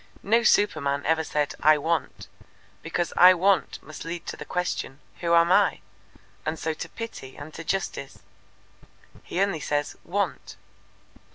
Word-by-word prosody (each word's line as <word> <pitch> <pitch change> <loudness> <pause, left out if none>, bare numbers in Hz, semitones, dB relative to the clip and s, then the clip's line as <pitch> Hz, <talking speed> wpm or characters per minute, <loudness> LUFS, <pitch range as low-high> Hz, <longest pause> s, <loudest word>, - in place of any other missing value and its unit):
"No 230 +3 +3
superman 150 -11 +2
ever 160 0 +2
said 150 -2 -1
'I 155 0 +6
want,' 160 +2 -2 0.5
because 170 +1 -2
'I 185 +1 +9
want' 190 +1 +1
must 155 - -9
lead 170 +1 -6
to - - -5
the - - -9
question, 180 -6 -3 0.2
'Who 170 -1 +2
am 170 +1 +5
I?' - - +3 0.6
and 155 +1 -2
so 160 0 -2
to - - -7
Pity 225 -13 -8
and 150 +2 -9
to 165 - -7
Justice. 170 -6 -3 1.0
He 175 - -5
only 195 -4 +1
says 145 0 -2
'want.' 170 - -3
165 Hz, 150 wpm, -26 LUFS, 150-180 Hz, 1.0 s, I